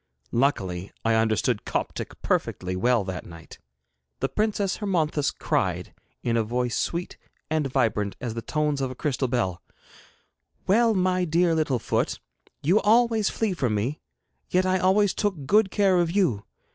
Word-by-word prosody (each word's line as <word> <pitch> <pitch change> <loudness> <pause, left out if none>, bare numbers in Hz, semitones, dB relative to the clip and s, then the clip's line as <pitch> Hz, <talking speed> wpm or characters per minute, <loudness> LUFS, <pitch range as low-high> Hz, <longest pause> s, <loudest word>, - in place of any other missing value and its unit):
Luckily 95 -8 0
I 115 - +3
understood 110 0 +1
Coptic - - -4
perfectly 90 0 -1
well 120 +3 +2
that 95 -2 -5
night. 85 -1 -12 0.6
The - - -1
Princess 210 -2 0
Hermonthis 160 -8 0
cried, - - -1 0.3
in 115 -1 0
a 115 - +2
voice 120 +2 -1
sweet 170 +1 -2 0.3
and 155 -3 +1
vibrant 110 -6 0
as 120 -3 -4
the 115 - -4
tones 150 +1 -1
of 135 - -1
a 130 - -7
crystal 135 -1 -1
bell: 115 -8 -1 1.0
'Well, 225 +3 +4
my 185 -1 +2
dear 170 0 +2
little 155 -5 +1
foot, - - -1 0.4
you 180 +9 +4
always 225 0 +3
flee 220 -4 -1
from 125 -10 0
me, 120 +9 -2 0.5
yet 185 +1 +2
I 185 0 +2
always 190 +1 +3
took 190 -10 -2
good 210 +5 +4
care 195 -2 +3
of 170 -1 +2
you. 165 - +1
150 Hz, 155 wpm, -25 LUFS, 115-185 Hz, 1.0 s, Well